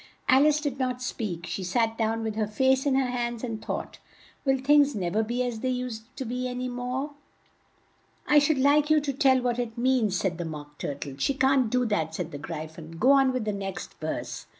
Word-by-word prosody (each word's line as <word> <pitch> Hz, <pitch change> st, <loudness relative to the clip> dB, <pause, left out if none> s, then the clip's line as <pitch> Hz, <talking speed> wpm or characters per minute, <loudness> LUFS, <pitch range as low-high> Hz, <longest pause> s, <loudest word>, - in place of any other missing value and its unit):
Al 270 Hz, +3 st, +6 dB
ice 300 Hz, 0 st, +3 dB
did 285 Hz, -3 st, -3 dB
not 255 Hz, -1 st, -1 dB
speak; 210 Hz, -9 st, -4 dB
she 190 Hz, -, -4 dB
sat 225 Hz, +5 st, +1 dB
down 225 Hz, 0 st, -1 dB
with 220 Hz, -1 st, -3 dB
her 215 Hz, -1 st, 0 dB
face 265 Hz, +5 st, +2 dB
in 270 Hz, -, +3 dB
her 265 Hz, -2 st, +1 dB
hands, 240 Hz, -1 st, -3 dB
and 225 Hz, -3 st, -4 dB
thought, -, -, -5 dB, 0.5 s
"Will 270 Hz, -1 st, +3 dB
things 285 Hz, 0 st, +4 dB
nev 180 Hz, -2 st, -2 dB
er 220 Hz, -, +4 dB
be 240 Hz, +3 st, -1 dB
as 240 Hz, -3 st, -3 dB
they 260 Hz, -, -1 dB
used 250 Hz, -3 st, -3 dB
to 270 Hz, -, -3 dB
an 250 Hz, +1 st, -3 dB
y 255 Hz, -, -2 dB
more?" 250 Hz, +3 st, -3 dB, 1.1 s
"I 295 Hz, -, +6 dB
should 290 Hz, 0 st, +2 dB
like 290 Hz, +3 st, +4 dB
you 310 Hz, 0 st, +5 dB
to 285 Hz, -1 st, -2 dB
tell 265 Hz, -1 st, +4 dB
what 245 Hz, -1 st, 0 dB
it 235 Hz, -2 st, -3 dB
means," 240 Hz, -6 st, +2 dB
said 180 Hz, -3 st, -1 dB
the 175 Hz, -, -2 dB
Mock 150 Hz, -2 st, -8 dB
Tur 140 Hz, -, -3 dB
tle. 140 Hz, -1 st, -7 dB
"She 275 Hz, -, +1 dB
can't 265 Hz, -3 st, +3 dB
do 250 Hz, +2 st, +1 dB
that," 165 Hz, -8 st, -1 dB
said 175 Hz, -2 st, -4 dB
the 145 Hz, -, -6 dB
Gry 155 Hz, +1 st, -5 dB
phon. 160 Hz, +1 st, -11 dB
"Go 255 Hz, +9 st, +5 dB
on 270 Hz, -1 st, +5 dB
with 255 Hz, -4 st, -2 dB
the 210 Hz, -, -1 dB
next 195 Hz, -2 st, -5 dB
verse." 155 Hz, 0 st, -4 dB
245 Hz, 230 wpm, -27 LUFS, 205-265 Hz, 1.1 s, Al